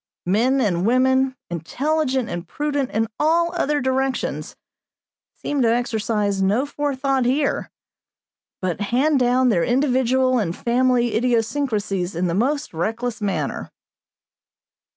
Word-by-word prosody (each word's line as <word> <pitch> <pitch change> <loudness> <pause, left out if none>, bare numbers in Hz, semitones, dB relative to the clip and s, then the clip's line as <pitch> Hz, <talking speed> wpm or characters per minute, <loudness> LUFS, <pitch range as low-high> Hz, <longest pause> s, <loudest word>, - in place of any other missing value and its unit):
Men 235 +9 +2
and 185 -8 +1
women, 260 +3 +2 0.2
intelligent 260 - -1
and 175 -5 -5
prudent 290 -3 -2
in 225 +1 0
all 335 +3 +2
other 295 -4 0
directions, 265 0 -2 0.8
seem 290 -2 -2
to 230 -2 +3
exercise 215 -4 0
no 205 +8 +2
forethought 275 -2 -1
here, 275 +3 0 0.9
but 185 +1 -2
hand 265 +8 +2
down 250 +1 +3
their 175 -7 +2
individual 255 0 +2
and 175 -5 -2
family 245 -1 +1
idiosyncrasies 225 - 0
in 175 +2 0
the 170 - 0
most 280 - -1
reckless 225 +7 -3
mariner. 180 -9 -2
245 Hz, 115 wpm, -22 LUFS, 210-270 Hz, 0.9 s, to